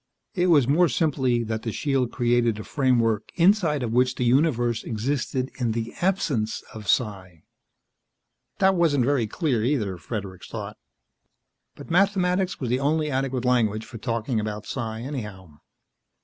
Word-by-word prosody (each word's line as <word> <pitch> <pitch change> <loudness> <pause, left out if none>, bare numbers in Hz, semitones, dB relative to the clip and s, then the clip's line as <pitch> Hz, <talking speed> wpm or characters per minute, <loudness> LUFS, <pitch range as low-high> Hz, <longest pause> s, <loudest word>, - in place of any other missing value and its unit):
It 180 -1 +1
was, 145 -8 +5
more 165 +5 +4
simply, 130 -3 +1
that 110 -1 -3
the 115 - -3
shield 135 -1 0
created 120 -2 +1
a 110 - -6
framework 120 -6 +1
inside 170 -6 +3
of 115 - -2
which 125 +1 +2
the - - -2
universe 120 -3 +2
existed 130 +3 -2
in 120 -3 0
the 115 0 -4
absence 150 - 0
of 110 -2 -9
psi. 95 -8 -1 1.1
That 190 -1 +4
wasn't 155 -8 +2
very 130 -5 +1
clear, 125 - -1
either, 110 -8 0
Fredericks 95 -1 -6
thought; - - -6 1.0
but - - -11
mathematics 190 0 +2
was 125 -4 -3
the 125 - +1
only 150 +2 0
adequate 130 -1 -1
language 110 -3 +1
for 120 -2 -10
talking 115 0 -1
about 105 0 -4
psi, 110 -3 -4
anyhow. 105 - -7
125 Hz, 150 wpm, -25 LUFS, 110-145 Hz, 1.1 s, was